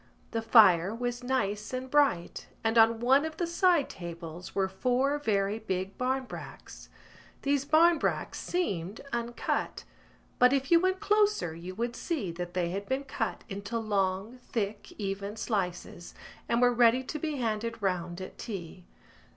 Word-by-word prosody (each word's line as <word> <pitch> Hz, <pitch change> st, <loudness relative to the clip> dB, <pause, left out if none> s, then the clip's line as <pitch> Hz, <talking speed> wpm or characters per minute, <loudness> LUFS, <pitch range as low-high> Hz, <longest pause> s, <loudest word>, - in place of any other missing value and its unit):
The 225 Hz, -, -1 dB
fire 210 Hz, -4 st, +6 dB
was 245 Hz, +1 st, -3 dB
nice 215 Hz, -4 st, -1 dB
and 255 Hz, +1 st, -3 dB
bright 260 Hz, -12 st, +1 dB, 0.2 s
and 225 Hz, 0 st, +1 dB
on 225 Hz, 0 st, +5 dB
one 265 Hz, +4 st, +4 dB
of 315 Hz, 0 st, -5 dB
the 345 Hz, -, 0 dB
side 340 Hz, -3 st, +3 dB
tables 170 Hz, -1 st, -8 dB
were 195 Hz, -1 st, +2 dB
four 255 Hz, +8 st, 0 dB
very 205 Hz, -4 st, 0 dB
big 190 Hz, -2 st, -3 dB
barmbracks. 260 Hz, 0 st, -4 dB, 0.5 s
These 280 Hz, -1 st, +1 dB
barmbracks 330 Hz, +3 st, +3 dB
seemed 200 Hz, -, -2 dB
uncut; 235 Hz, 0 st, -2 dB, 0.6 s
but 250 Hz, +1 st, +6 dB
if 270 Hz, +1 st, 0 dB
you 335 Hz, -, +8 dB
went 375 Hz, +1 st, 0 dB
closer 420 Hz, -, +2 dB
you 175 Hz, +3 st, -8 dB
would 235 Hz, +3 st, -2 dB
see 265 Hz, -, -3 dB
that 175 Hz, +1 st, -6 dB
they 175 Hz, -2 st, 0 dB
had 200 Hz, +2 st, -5 dB
been 265 Hz, +1 st, 0 dB
cut 275 Hz, -, -3 dB
into 200 Hz, +3 st, -4 dB
long 205 Hz, +1 st, -1 dB
thick 210 Hz, -4 st, -4 dB
even 200 Hz, 0 st, -4 dB
slices 180 Hz, -5 st, -3 dB, 0.3 s
and 235 Hz, +1 st, +3 dB
were 245 Hz, 0 st, +5 dB
ready 240 Hz, +1 st, +4 dB
to 305 Hz, +4 st, -5 dB
be 310 Hz, 0 st, -2 dB
handed 230 Hz, -2 st, -2 dB
round 180 Hz, -3 st, -2 dB
at 185 Hz, -, -9 dB
tea. 180 Hz, -5 st, -7 dB
225 Hz, 150 wpm, -29 LUFS, 190-265 Hz, 0.6 s, you